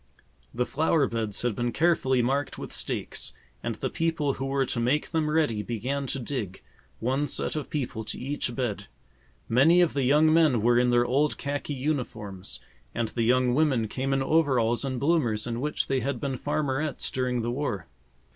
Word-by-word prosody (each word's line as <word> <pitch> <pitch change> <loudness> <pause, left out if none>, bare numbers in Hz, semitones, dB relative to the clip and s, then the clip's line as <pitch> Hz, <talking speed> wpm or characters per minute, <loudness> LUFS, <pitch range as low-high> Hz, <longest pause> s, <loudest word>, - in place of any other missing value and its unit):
The 125 +1 -1
flower 155 +1 +2
beds 115 -4 -2
had 120 -4 0
been 120 +2 -1
carefully 135 -5 +2
marked 140 +3 -1
with - - -7
stakes, - - -3 0.3
and - - -3
the - - -3
people 160 -4 0
who 135 - -4
were 135 0 +1
to 120 - -2
make 130 +6 +1
them 160 -2 +1
ready 150 -9 +1
began 130 +6 -3
to 135 - -1
dig, 120 -7 -4 0.4
one 135 +5 0
set - - -1
of 150 - -4
people 130 -7 -3
to - - -4
each 130 -2 -3
bed. 120 - -2 0.6
Many 145 +9 +5
of 175 -3 +3
the 140 - 0
young 150 +4 +4
men 155 -9 +4
were 120 +1 +5
in 125 0 +3
their 120 0 +4
old 140 +5 +1
khaki 145 0 -3
uniforms, 115 -9 -3 0.4
and 115 -2 -1
the 115 - -3
young 125 +2 +3
women 130 -6 +2
came 135 +5 -2
in 135 0 +2
overalls 130 -7 +2
and 130 -2 -2
bloomers 140 -8 +1
in 120 0 -3
which 150 +2 -1
they 135 -1 +1
had 130 0 -2
been 135 0 -2
farmerettes 150 +1 -1
during 125 -2 -1
the 120 - -1
war. 120 - -2
130 Hz, 185 wpm, -27 LUFS, 120-145 Hz, 0.6 s, Many